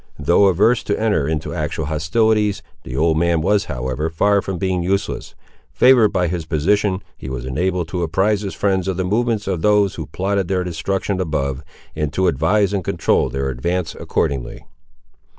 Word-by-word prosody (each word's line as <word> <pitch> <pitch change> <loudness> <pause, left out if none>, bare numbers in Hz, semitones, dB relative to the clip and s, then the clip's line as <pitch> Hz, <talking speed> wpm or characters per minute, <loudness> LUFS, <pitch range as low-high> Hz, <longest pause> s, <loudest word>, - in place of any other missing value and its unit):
Though 85 +7 +4
averse 105 +6 +3
to 100 - -1
enter 100 -10 +1
into 80 -1 -3
actual 80 - -3
hostilities, 105 +7 +1 0.2
the 65 - -8
old 80 +1 +2
man 85 -1 +2
was, 105 +5 +2
however, 65 +2 -3
far 100 +5 +2
from 95 -2 -4
being 95 0 -1
useless. 95 +3 -2 0.4
Favoured 125 +3 +6
by 90 -2 +1
his 85 -2 -4
position, 95 +5 +1
he 65 - -8
was 65 -1 -5
enabled 90 +6 -1
to 90 - -3
apprise 95 +5 +1
his 100 -2 -5
friends 95 -2 0
of 95 -2 -1
the 95 - 0
movements 110 +2 0
of 85 - -1
those 105 -1 +3
who - - -6
plotted 95 0 -1
their 95 -1 0
destruction 95 +3 -2
above, 70 -5 -2 0.3
and 75 -1 -2
to 95 - +1
advise 95 +7 +2
and 100 -2 -1
control - - +1
their 70 0 -2
advance 85 +7 -2
accordingly. 65 -4 -3
90 Hz, 175 wpm, -20 LUFS, 80-100 Hz, 0.4 s, Favoured